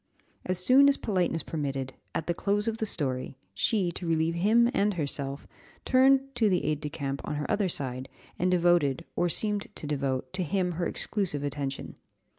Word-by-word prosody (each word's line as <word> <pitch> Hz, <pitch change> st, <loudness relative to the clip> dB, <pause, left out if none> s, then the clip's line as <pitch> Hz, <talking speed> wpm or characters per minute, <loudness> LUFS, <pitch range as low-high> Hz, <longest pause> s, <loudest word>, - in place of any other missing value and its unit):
As 185 Hz, 0 st, 0 dB
soon 260 Hz, +10 st, +6 dB
as 280 Hz, -, +2 dB
politeness 180 Hz, -5 st, 0 dB
permitted, 135 Hz, -4 st, -3 dB, 0.2 s
at 160 Hz, -, -1 dB
the 175 Hz, -, 0 dB
close 205 Hz, +4 st, 0 dB
of 225 Hz, 0 st, -1 dB
the 220 Hz, -, 0 dB
story, 130 Hz, -6 st, -1 dB, 0.2 s
she, 195 Hz, -7 st, +1 dB
to 170 Hz, +1 st, -6 dB
relieve 165 Hz, 0 st, +1 dB
him 215 Hz, +7 st, +4 dB
and 205 Hz, 0 st, +1 dB
herself, 140 Hz, -3 st, -2 dB, 0.4 s
turned 270 Hz, +1 st, +4 dB
to 230 Hz, -4 st, +2 dB
the 180 Hz, -2 st, +1 dB
aide 155 Hz, 0 st, 0 dB
de 150 Hz, -, -3 dB
camp 140 Hz, -3 st, -4 dB
on -, -, -3 dB
her 145 Hz, 0 st, -2 dB
other 205 Hz, -3 st, +1 dB
side, 130 Hz, -4 st, -4 dB, 0.3 s
and 180 Hz, -, +2 dB
devoted, 175 Hz, -6 st, +2 dB
or 175 Hz, -, +1 dB
seemed 210 Hz, +3 st, -1 dB
to -, -, -7 dB
devote, 140 Hz, -2 st, -2 dB
to 185 Hz, -, -2 dB
him 180 Hz, +1 st, 0 dB
her 175 Hz, +1 st, -1 dB
exclusive 180 Hz, -9 st, -2 dB
attention. 140 Hz, -1 st, -4 dB
175 Hz, 185 wpm, -28 LUFS, 145-205 Hz, 0.4 s, soon